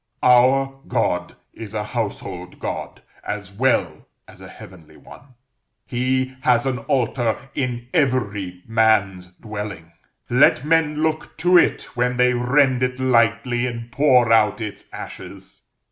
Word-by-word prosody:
Our 135 +2 +4
God 90 -7 -1 0.2
is 110 -1 -9
a 105 - -1
household 100 -5 -5
God, - - -6 0.2
as 100 -2 -5
well 130 +6 0 0.2
as - - -16
a - - -10
heavenly 90 -4 -14
one; 130 -3 -16 0.5
He 130 +1 -1
has 125 -1 +2
an 130 -2 -1
altar 120 -3 0 0.2
in 120 -3 -3
every 105 - -1
man's 105 -5 +1
dwelling; 100 -3 -8 0.4
let 125 - +4
men 155 -1 +1
look 155 -1 -2
to 180 +1 +5
it 175 - +4
when 125 0 0
they 125 0 +3
rend 130 +1 +2
it 125 0 -1
lightly 120 0 +1
and 120 -1 -7
pour 125 -5 +4
out 105 -1 +3
its 105 -3 -7
ashes. - - -10
120 Hz, 130 wpm, -21 LUFS, 105-130 Hz, 0.5 s, to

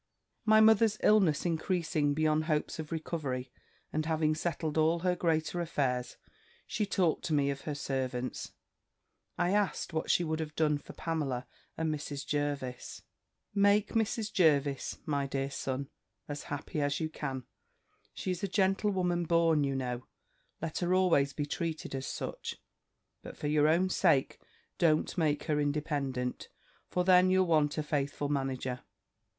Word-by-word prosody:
"My 215 0 +6
mother's 220 0 +5
illness 190 -9 +4
increasing 160 -3 0
beyond 155 0 +2
hopes 155 0 -1
of 155 0 -6
recovery, 150 -6 -3 0.4
and 155 0 -1
having 155 -1 +2
settled 160 -1 -2
all 160 +2 +3
her 180 0 +2
greater 165 0 0
affairs, 130 -7 -1 0.5
she 210 -2 -2
talked 180 -5 +1
to 155 - +1
me 140 -1 +2
of 140 0 -6
her 150 - -2
servants; 130 -3 -3 0.9
I 175 - +1
asked 205 -4 0
what 160 - -2
she 175 - +4
would 160 -1 -2
have 155 -1 -5
done 150 -2 +2
for - - -12
Pamela 145 -6 -2 0.3
and 160 -1 0
Mrs. 145 -1 -5
Jervis. 145 -4 -3 0.5
"'Make 205 +1 +4
Mrs. 220 -1 -1
Jervis, 145 -6 +2
my 140 -2 0
dear 135 0 -2
son, 135 0 -3 0.4
as 145 0 -6
happy 145 +2 -4
as 145 0 0
you 160 - -1
can: 135 -4 -5 0.7
she 185 - -2
is 180 - -3
a 200 - 0
gentlewoman 190 -2 +1
born, 165 -2 +3
you 135 -1 0
know; 125 -1 -3 0.6
let 165 -1 -2
her 180 +1 +2
always 165 -7 +3
be 145 +1 -3
treated 160 +1 -4
as 135 0 -3
such; - - -5 0.7
but - - -10
for - - -6
your 150 0 +3
own 170 +4 +3
sake, 165 -7 +2 0.4
don't 155 -3 +2
make 155 -5 +1
her 150 -1 0
independent; 145 -4 -2 0.4
for 180 - 0
then 185 0 +6
you'll 185 0 +4
want 155 -3 +2
a 155 - 0
faithful 145 -1 -1
manager. 135 -3 -2
155 Hz, 155 wpm, -31 LUFS, 140-175 Hz, 0.9 s, My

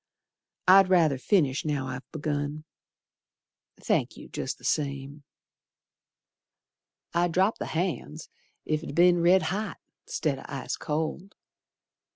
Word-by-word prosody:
I'd 190 0 +7
ruther 160 -7 +4
finish 140 -1 +2
now 145 -4 -1
I've 130 +1 -7
begun. 150 -1 -3 1.2
Thank - - 0
you, - - -11
jest - - -4
the - - -22
same. 140 0 -2 1.9
I 170 +1 +3
dropped 185 +5 +1
the - - -3
hand's 160 -2 -3 0.4
ef 155 0 0
it'd 155 -3 -7
be'n 175 0 +5
red 180 +2 +5
hot 210 -2 -3 0.3
'Stead 140 -4 -1
o' - - -11
ice 140 -2 -4
cold. 160 +6 -3
155 Hz, 120 wpm, -27 LUFS, 145-180 Hz, 1.9 s, I'd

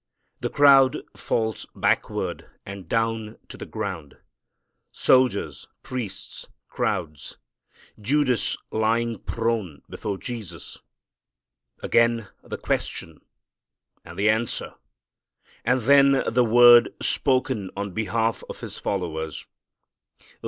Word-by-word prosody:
The - - -2
crowd 135 -2 +6 0.2
falls 110 -2 -2
backward - - -1 0.2
and 100 -3 -9
down 115 -1 -1
to - - -8
the - - -9
ground. 80 -8 -6 0.7
Soldiers, 100 - +1 0.2
priests, 120 -7 -6 0.2
crowds, 75 -2 -3 0.6
Judas 130 +1 +1
lying 115 0 0
prone 115 -9 -3
before 100 -2 -5
Jesus! 105 - -8 1.0
Again 115 -2 +2
the - - -6
question 80 -1 -3 0.8
and 85 +1 -12
the 100 +2 +1
answer, 110 +1 -2 0.9
and 125 +2 +2
then 140 +2 +5
the 125 0 +4
word 120 +1 +7
spoken 130 -7 0
on 100 0 -3
behalf 110 +3 -1
of - - -8
His - - -6
followers. 80 -5 -4
115 Hz, 95 wpm, -24 LUFS, 100-120 Hz, 1.0 s, word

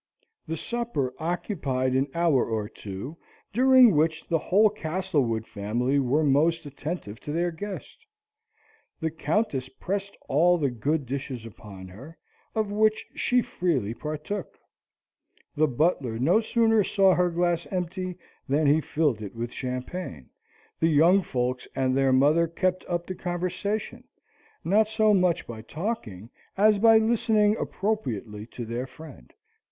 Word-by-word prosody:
The 160 - -3
supper 235 - -2
occupied 150 -7 -1
an 135 +2 +2
hour 165 -7 +3
or 110 -2 -2
two, 105 - -8 0.4
during 255 -3 +6
which 160 +1 +1
the 165 - +1
whole 205 +6 +3
Castlewood 155 - -1
family 120 +7 -1
were 140 +4 +2
most 160 +3 +2
attentive 145 - -6
to 145 - -6
their 170 +3 0
guest. 205 - -8 0.9
The 160 0 -1
Countess 155 - -1
pressed 200 +1 -4
all 175 +6 +4
the 140 -5 0
good 140 +5 -1
dishes 130 -2 -5
upon 100 -4 -11
her, 135 - -12 0.4
of 215 -2 0
which 215 +1 +2
she 245 -1 +1
freely 135 - -1
partook: 155 - -5 1.0
the 155 +1 +3
butler 130 -4 0
no 155 - +3
sooner 225 -1 +3
saw 195 0 +4
her 180 0 +2
glass 175 0 0
empty 185 0 -3 0.3
than 150 +3 +2
he 150 +3 +4
filled 145 -8 0
it 100 -1 -7
with 120 +1 -4
champagne: 125 - -5 0.5
the 165 - +3
young 165 +6 +5
folks 125 -5 -2
and 130 -1 +1
their 135 -1 +3
mother 150 +6 +4
kept 185 +2 -1
up 175 -1 -2
the 185 - -5
conversation, 180 +4 -3 0.6
not 210 +5 +3
so 215 -1 +3
much 180 -3 +2
by 115 -2 -8
talking, 120 - -5 0.3
as 210 +1 +4
by 225 +1 +7
listening 220 -2 +3
appropriately 115 - -3
to 120 0 -7
their 120 +3 -4
friend. 130 - -13
160 Hz, 140 wpm, -26 LUFS, 130-190 Hz, 1.0 s, by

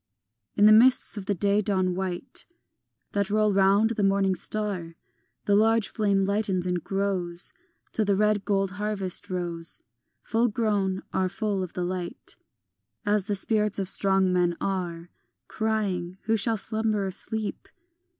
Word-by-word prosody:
In 205 - +5
the 215 - +8
mists 240 +4 +5
of 200 -2 -6
the 205 - +1
day 200 +3 +2
dawn 190 -3 0
white 185 +6 -4 0.6
That 200 -1 0
roll 215 0 +2
round 200 +3 +4
the 220 - -2
morning 195 -1 +3
star, 185 -4 -3 0.5
The 205 - +2
large 225 +1 +3
flame 200 -3 +1
lightens 195 -2 0
and 180 -2 -1
grows 185 -3 -1 0.4
Till 220 - 0
the 200 -1 +2
red 210 0 +2
gold 195 -2 0
harvest 205 -2 -2
rows, 170 -2 -2 0.4
Full 230 +2 +1
grown, 205 -4 0
are 185 -1 +1
full 200 0 -2
of 180 -2 -5
the 180 - -2
light 180 -1 -4 0.7
As 205 -2 +2
the 205 -1 -1
spirits 210 +1 0
of 195 -2 0
strong 190 -1 +3
men 175 -1 +1
are, 175 -3 -3 0.4
Crying, 200 -5 -2
Who 225 +1 +1
shall 225 +1 +1
slumber 215 -1 -1
or 190 - -2
sleep? 215 +3 -3
200 Hz, 150 wpm, -26 LUFS, 185-215 Hz, 0.7 s, the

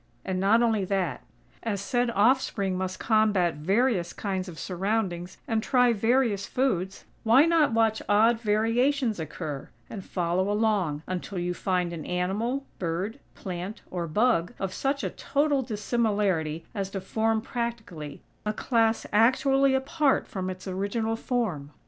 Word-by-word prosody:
And 185 -1 -1
not 215 +5 +4
only 220 -4 +2
that. 185 -8 -1 0.4
As 210 -4 -2
said 245 +4 0
offspring 205 -4 +2
must 185 0 -3
combat 210 -6 +3
various 190 - +1
kinds 190 -2 -3
of 165 - -10
surroundings 185 -1 -2
and 225 -1 +1
try 250 0 +3
various 225 -2 +1
foods, 195 -8 -1 0.2
why 245 +6 +6
not 330 -6 +3
watch 225 -1 +2
odd 225 +3 +4
variations 230 +2 +1
occur, 150 -3 -5 0.2
and 200 -4 -6
follow 180 +2 -1
along, 205 -8 +1
until 185 +1 -4
you 175 0 -1
find 180 -1 -1
an 160 -2 -6
animal, 210 +10 -1
bird, 185 +8 -2 0.2
plant 185 +3 -6
or 175 -2 -3
bug 185 0 +1
of 190 -1 -3
such 275 +5 -1
a - - -2
total 285 -1 +1
dissimilarity 205 -8 0
as 195 -3 -3
to 195 - -4
form 220 +3 0
practically, 220 - -5 0.2
a 210 - -1
class 225 0 +1
actually 265 +4 +4
apart 275 +1 +1
from 185 -1 -4
its 185 +1 -7
original 205 +4 -1
form? 215 - -2
210 Hz, 145 wpm, -27 LUFS, 185-235 Hz, 0.4 s, why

